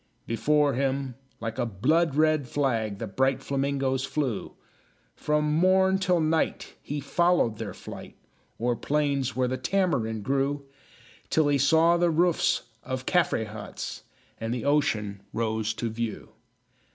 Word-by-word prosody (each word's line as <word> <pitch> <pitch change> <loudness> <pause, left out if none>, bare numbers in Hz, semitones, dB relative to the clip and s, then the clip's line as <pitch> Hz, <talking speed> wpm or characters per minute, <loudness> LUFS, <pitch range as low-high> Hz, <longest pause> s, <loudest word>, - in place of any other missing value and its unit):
Before 145 +5 +2
him, 135 0 -1 0.3
like 110 -1 -4
a - - +1
blood 140 - +1
red 155 -3 +3
flag, 115 -7 -1
The 115 - -4
bright 130 +5 0
flamingoes 135 -1 0
flew; 135 -5 -2 0.6
From 150 0 0
morn 190 +3 +4
till 180 -2 +2
night 160 0 0
he 145 +1 -4
followed 155 -6 +2
their 105 -5 -5
flight, - - -10 0.4
O'er 120 +1 +1
plains 140 -3 0
where 130 0 +1
the 130 +1 -2
tamarind 130 - 0
grew, 140 +3 0 0.6
Till 155 -2 +3
he 140 -1 +2
saw 160 +5 +4
the 175 0 +3
roofs 170 +1 +2 0.2
of 130 0 -5
Caffre 170 -10 +2
huts, 105 0 -7 0.4
And 115 0 -3
the 120 0 -3
ocean 110 -9 +1
rose 110 -1 -1
to 120 - -2
view. 115 -1 -4
140 Hz, 140 wpm, -27 LUFS, 115-155 Hz, 0.6 s, morn